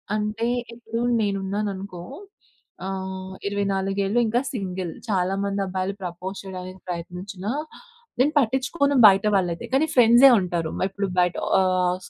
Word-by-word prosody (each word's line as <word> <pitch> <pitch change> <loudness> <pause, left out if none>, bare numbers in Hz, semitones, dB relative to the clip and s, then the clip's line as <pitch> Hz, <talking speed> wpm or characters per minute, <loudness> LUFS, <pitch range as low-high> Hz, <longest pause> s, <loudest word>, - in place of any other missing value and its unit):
అంటే, 215 +2 -1 0.3
ఇప్పుడూ 230 0 -5 0.2
నేనున్నాననుకో 195 -2 -3 0.9
ఆహ్, 190 0 -5
24ఏళ్ళు 195 +1 0
ఇంకా 235 +3 +2
సింగిల్. 185 -6 -4 0.2
చాలా 190 -3 +1
మంది 200 0 -1
అబ్బాయిలు 190 +1 -2
ప్రపోజ్ 180 +2 -5
చేయడానికి 185 0 -8
ప్రయత్నించినా, 180 +3 -5 0.7
నేను 285 +4 +4
పట్టిచ్చుకోను 280 +3 +1
బయట 195 +1 +4
వాళ్ళైతే, 175 -3 0
కానీ 285 +4 +4
ఫ్రెండ్సే 245 +2 +8
ఉంటారు. 175 -3 -2
మై - - +1
ఇప్పుడు 200 +1 -3
బయట 180 0 +2 0.2
ఆహ్, 185 -1 +2
స్‌ - - -12
195 Hz, 125 wpm, -24 LUFS, 185-215 Hz, 0.9 s, ఫ్రెండ్సే